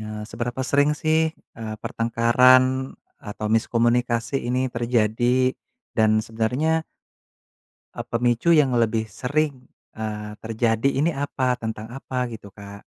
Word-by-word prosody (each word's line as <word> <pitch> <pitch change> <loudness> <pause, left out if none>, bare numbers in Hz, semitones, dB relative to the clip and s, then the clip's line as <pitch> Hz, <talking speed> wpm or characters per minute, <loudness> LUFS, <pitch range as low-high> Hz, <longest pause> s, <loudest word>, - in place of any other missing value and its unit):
Nah 105 0 -7
seberapa 120 +2 -4
sering 145 +3 +2
sih, 160 +1 +1 0.2
eee, 110 -1 -5
pertengkaran 130 +3 +3 0.2
atau 105 +1 -6
miskomunikasi 120 +2 +1
ini 130 +1 0
terjadi 120 +2 +1 0.4
dan 110 -1 +4
sebenarnya 125 +9 -1 1.1
Eee, - - -4
pemicu 120 +5 +1
yang 145 -6 +4
lebih 115 -1 +1
sering, 140 +4 -2 0.3
eee, 105 -1 -5
terjadi 115 +2 +1
ini 160 +4 +2
apa? 130 -2 -1
tentang 110 -2 -6
apa 130 -2 -3
gitu, 105 -3 -10
Kak? 100 0 -11
120 Hz, 115 wpm, -23 LUFS, 110-130 Hz, 1.1 s, dan